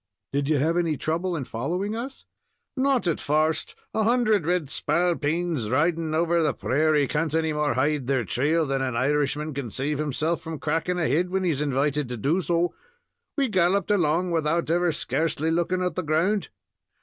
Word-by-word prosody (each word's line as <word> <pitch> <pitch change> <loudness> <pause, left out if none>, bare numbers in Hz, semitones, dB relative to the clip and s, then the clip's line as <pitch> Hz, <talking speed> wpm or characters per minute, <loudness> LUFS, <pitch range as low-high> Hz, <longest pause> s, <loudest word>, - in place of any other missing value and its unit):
"Did 140 +1 0
you 155 - +3
have 160 +5 +1
any 165 -4 +1
trouble 170 +5 -1
in 150 - -3
following 175 - -3
us?" 255 +4 -6 0.5
"Not 265 -3 +2
at 170 -3 0
first; 155 +2 0 0.2
a 220 - +1
hundred 215 -6 +2
red 175 -6 0
spalpeens 165 -4 0
riding 160 +4 +1
over 170 +1 +2
the 155 - +1
prairie 150 +1 +2
can't 155 +2 -1
any 160 -1 +1
more 150 -4 0
hide 140 0 0
their 130 -4 +1
trail 155 - +1
than 135 -1 -1
an 130 -2 -2
Irishman 145 +4 0
can 135 -3 -4
save 140 +6 -2
himself 155 +3 -1
from 160 -1 -6
cracking 165 +5 -1
a 170 - +1
head 170 +8 +1
when 190 +1 -1
he 175 - +2
is 145 -2 -2
invited 145 -1 0
to 125 - -4
do 150 - +1
so. 175 0 0 0.6
We 275 -2 +2
galloped 190 -1 +2
along, 175 -2 +2
without 165 0 0
ever 175 0 +2
scarcely 160 +1 -1
looking 175 +2 0
at 180 -2 -1
the 185 - -2
ground. 175 +6 0
160 Hz, 185 wpm, -25 LUFS, 145-175 Hz, 0.6 s, you